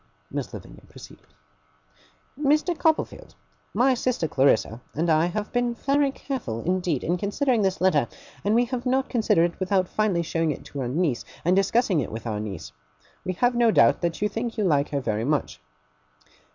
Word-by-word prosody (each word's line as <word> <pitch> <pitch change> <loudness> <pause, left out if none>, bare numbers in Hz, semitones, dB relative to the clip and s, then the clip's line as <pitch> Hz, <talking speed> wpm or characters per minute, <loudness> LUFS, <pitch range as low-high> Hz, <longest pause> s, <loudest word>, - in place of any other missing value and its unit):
Miss - - -4
Lavinia - - -10
proceeded: - - -14 1.1
'Mr. 300 +4 +2
Copperfield, 315 0 -1 0.4
my 260 +2 +3
sister 245 -8 -1
Clarissa 130 -4 +2
and 165 +3 +1
I 160 +2 +3
have 210 +4 -4
been 245 -1 0
very 280 +3 +1
careful 250 - -5
indeed 180 -5 0
in 175 +2 0
considering 230 +5 0
this 190 -2 0
letter; 155 -9 +3 0.4
and 205 +2 +2
we 240 +1 +4
have 250 0 -4
not 265 +1 +1
considered 175 -8 +2
it - - -24
without 190 -1 +1
finally 200 -5 0
showing 165 0 -1
it 150 - -4
to 140 - -6
our 125 - -2
niece, 145 -1 0 0.2
and 180 +2 +4
discussing 195 -1 +2
it 130 - -3
with 110 +1 -7
our 110 -3 -2
niece. 100 -6 -6 0.5
We 185 - -2
have 245 +7 +2
no 240 -1 +3
doubt - - +4
that 170 +3 -1
you - - +3
think 225 +2 -4
you 215 - +1
like 145 -6 +2
her 140 -1 -1
very 110 -3 -1
much. 140 - -1
185 Hz, 180 wpm, -25 LUFS, 150-240 Hz, 1.1 s, we